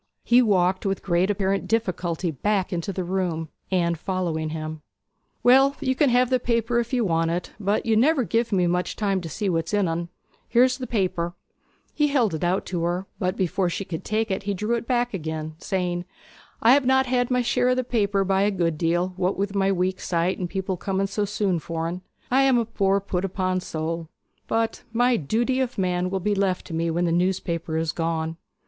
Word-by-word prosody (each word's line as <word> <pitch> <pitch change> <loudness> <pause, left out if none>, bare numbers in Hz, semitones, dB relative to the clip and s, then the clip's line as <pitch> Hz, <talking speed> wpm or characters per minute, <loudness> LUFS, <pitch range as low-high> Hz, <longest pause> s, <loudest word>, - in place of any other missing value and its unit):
He 240 +1 +5
walked 185 -4 +2
with 195 -1 -2
great 180 +1 +2
apparent 195 -1 0
difficulty 180 -6 -1
back 195 +5 -1
into 175 +3 -2
the 185 -1 -3
room, 175 -3 -2 0.2
Anne 175 -2 +1
following 165 -2 -2
him. 155 0 -5 0.6
'Well, 270 +3 +6
you 260 -2 +1
can 280 +1 +3
have 250 +1 +3
the 255 - +3
paper 235 0 +1
if 235 0 -3
you 245 -4 +1
want 165 -2 +1
it; 175 +1 -3
but 205 +1 0
you 225 -1 +2
never 270 +4 +4
give 230 +1 0
me 185 -3 +3
much 180 +1 0
time 195 -3 0
to 165 - -6
see 205 +6 -3
what's 165 +1 0
in 205 -3 +2
en! 170 +1 -2 0.4
Here's 250 +2 +4
the 255 - -4
paper.' 180 -5 -1 0.6
He 295 - +2
held 250 - +2
it 160 - -3
out, 180 +2 0 0.5
but 185 -1 0
before 185 0 0
she 195 +3 -3
could 165 -3 -5
take 215 0 -1
it 190 - -1
he 200 0 -2
drew 210 +5 -1
it 230 -1 -2
back 245 -1 +1
again, 160 -3 -4
saying, 180 -2 -2 0.6
'I 230 - +7
have 280 -1 +3
not 265 0 +4
had 245 -1 +1
my 250 -1 +2
share 245 +1 +2
o' 255 - +3
the 255 - 0
paper 205 -5 +1
by 195 0 +1
a 205 - +3
good 170 -5 -1
deal, 175 +2 +1
what 185 +1 0
with 200 0 -1
my 195 -1 +2
weak 185 0 0
sight, 170 +1 0
and 180 -2 -3
people 190 -1 -2
coming 195 +2 -1
so 205 +1 -1
soon 200 -4 0
for 165 +1 -3
en. 180 +2 -5 0.3
I 265 +2 +5
am 270 -2 +4
a 235 - +1
poor 200 -3 +1
put 185 -2 -2
upon 185 -1 -1
soul; 165 -1 -4 0.4
but 225 0 0
my 245 +2 +3
"Duty 235 - 0
of 255 -2 -1
Man" 180 -1 0
will 190 0 -1
be 205 +3 0
left 195 -2 0
to 165 - -8
me 165 +1 0
when 170 +2 0
the 170 - +1
newspaper 170 -2 0
is 160 -1 0
gone.' 165 0 -2
190 Hz, 210 wpm, -24 LUFS, 175-230 Hz, 0.6 s, I